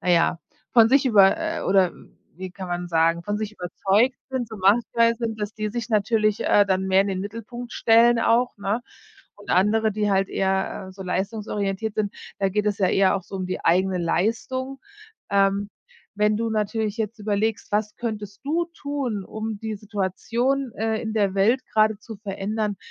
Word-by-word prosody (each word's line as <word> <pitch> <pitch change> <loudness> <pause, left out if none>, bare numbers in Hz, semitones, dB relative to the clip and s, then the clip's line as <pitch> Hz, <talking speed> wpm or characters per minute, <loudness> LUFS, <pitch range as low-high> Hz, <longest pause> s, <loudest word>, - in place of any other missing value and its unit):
naja, 170 -2 +2 0.3
von 225 -2 +7
sich 275 +1 +4
über 200 0 +6
äh, 325 0 -3
oder 190 -2 +3 0.5
wie 185 -1 -7
kann 190 -2 -7
man 175 0 -3
sagen, 165 0 +1
von 205 0 -1
sich 215 -1 -3
überzeugt 200 +6 +1 0.2
sind, 255 -3 -2
so 220 - -8
machtgeil 230 +4 +3
sind, 225 -2 -4
dass 210 +1 -3
die 215 -1 -3
sich 235 +1 -4
natürlich, 215 -1 +2
äh, 205 - +5
dann 190 -1 0
mehr 190 0 +4
in 200 - -3
den 190 -1 -2
Mittelpunkt 230 +4 -7
stellen 230 +1 +4
auch, 240 +1 +2
ne? 205 +4 -1 0.5
Und 205 - -10
andere, 215 +4 +3
die 210 0 0
halt 195 0 +2
eher, 190 0 -1
äh, - - -13
so 190 0 -9
leistungsorientiert 200 +2 -2
sind, 205 -2 -1 0.2
da 195 - +1
geht 210 +2 -1
es 205 -1 0
ja 190 - +3
eher 195 0 +3
auch 190 - -5
so - - -11
um 185 -1 -3
die 185 - -5
eigene 185 +2 +2
Leistung. 230 +10 -1 0.5
Ähm, 200 0 +2 0.5
wenn 210 0 +2
du 230 0 -1
natürlich 215 0 -1
jetzt 220 +1 -3
überlegst, 210 +1 -1
was 210 0 0
könntest 210 -2 -6
du 330 +4 0
tun, 265 -9 -3
um 220 -1 -5
die 220 -1 -4
Situation, 230 +6 -1
äh, 220 0 -1
in 220 -2 -4
der 200 -3 +1
Welt 235 +7 +2
gerade 215 -1 +3
zu 220 0 -10
verändern, 205 +1 -3
210 Hz, 185 wpm, -24 LUFS, 195-225 Hz, 0.5 s, von